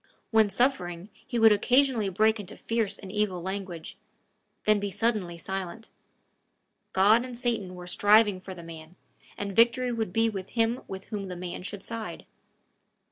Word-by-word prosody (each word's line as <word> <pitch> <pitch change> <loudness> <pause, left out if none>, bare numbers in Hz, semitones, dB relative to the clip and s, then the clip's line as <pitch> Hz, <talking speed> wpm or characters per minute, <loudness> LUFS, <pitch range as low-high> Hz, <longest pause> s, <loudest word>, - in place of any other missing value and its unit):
When 220 -2 +5
suffering, 195 -5 0
he 245 - -6
would 225 -1 +7
occasionally 245 0 +3
break 220 +4 +2
into 205 +1 -8
fierce 225 -3 -1
and 190 -2 -9
evil 210 -3 0
language, 190 -2 -6 0.7
then 215 -1 +4
be 200 0 -2
suddenly 205 -4 -1
silent. 195 +5 -6 1.0
God 210 +5 +5
and 250 -2 -7
Satan 230 -7 -2
were 180 0 -9
striving 205 +1 +4
for 190 0 -8
the 170 - -10
man, 165 0 -11 0.4
and 200 -1 -4
victory 240 +3 +4
would 225 -5 -2
be 225 +4 +2
with 195 -4 -4
him 230 +1 +1
with 190 0 -8
whom 205 -3 -4
the 180 - -6
man 175 0 -6
should 195 +1 -6
side. 230 -1 -6
205 Hz, 160 wpm, -28 LUFS, 185-225 Hz, 1.0 s, would